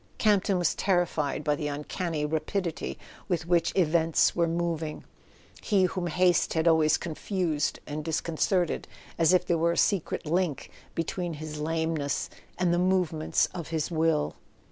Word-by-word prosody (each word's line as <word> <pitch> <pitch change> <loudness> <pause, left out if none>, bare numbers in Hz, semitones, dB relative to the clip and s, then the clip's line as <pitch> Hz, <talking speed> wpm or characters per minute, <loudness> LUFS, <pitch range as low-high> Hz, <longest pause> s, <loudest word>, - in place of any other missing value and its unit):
Camp 205 -3 +3
ton 195 - +2
was 175 -2 +2
terrified 160 -6 0
by 150 0 +2
the 150 0 -3
uncanny 150 +2 -3
rapidity 160 +3 -2 0.3
with 175 -4 -1
which 170 -1 +2
events 165 -2 +3
were 170 -1 +2
moving, 165 -2 -2 0.6
he 200 -4 +2
whom 180 -1 -1
haste 180 0 +2
had 160 +1 +2
always 160 -2 +4
con¬ 160 -2 -5
fused 170 -7 -1
and 150 +1 -5
disconcerted, 165 +2 0 0.3
as 165 0 +5
if 185 - +3
there 170 -2 +1
were 170 +1 +2
a - - -5
secret 195 -5 +1
link 170 -2 -1 0.2
between 170 0 -2
his 150 0 -7
lameness 160 -2 -1 0.3
and 180 -2 +2
the 175 - +2
movements 180 -4 +2
of 170 -4 -5
his 160 0 -2
will. 160 - +1
165 Hz, 155 wpm, -28 LUFS, 155-180 Hz, 0.6 s, as